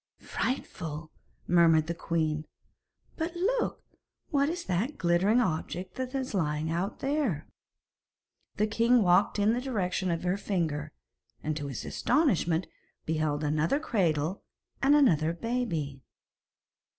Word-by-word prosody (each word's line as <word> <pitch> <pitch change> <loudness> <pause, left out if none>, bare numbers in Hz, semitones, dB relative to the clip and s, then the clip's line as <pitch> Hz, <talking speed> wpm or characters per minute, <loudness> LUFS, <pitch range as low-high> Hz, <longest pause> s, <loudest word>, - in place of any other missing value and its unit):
'Frightful,' 160 - -4 0.3
murmured 165 -3 +5
the 170 - -2
queen; 155 -2 -1 0.7
'but 330 +1 -3
look, 455 +8 0 0.5
what 285 -1 +3
is 345 +1 -4
that 205 +11 -1
glittering 185 +6 +3
object 180 -2 -2
that 260 +1 -4
is 260 -3 -2
lying 155 -3 0
out 175 +5 -2
there?' 270 - 0 1.1
The 210 - +2
king 230 +2 +3
walked 180 +4 +4
in 205 +2 +3
the 245 - -1
direction 190 -7 -1
of 165 0 -1
her 180 +2 +1
finger, 170 -8 -2 0.5
and 155 0 -1
to 145 -2 -4
his 135 -4 -5
astonishment 185 - +1 0.4
beheld 155 -1 0
another 155 - +1
cradle 175 - 0 0.4
and 280 +2 +5
another 165 - +4
baby. 170 - -2
180 Hz, 125 wpm, -29 LUFS, 155-250 Hz, 1.1 s, murmured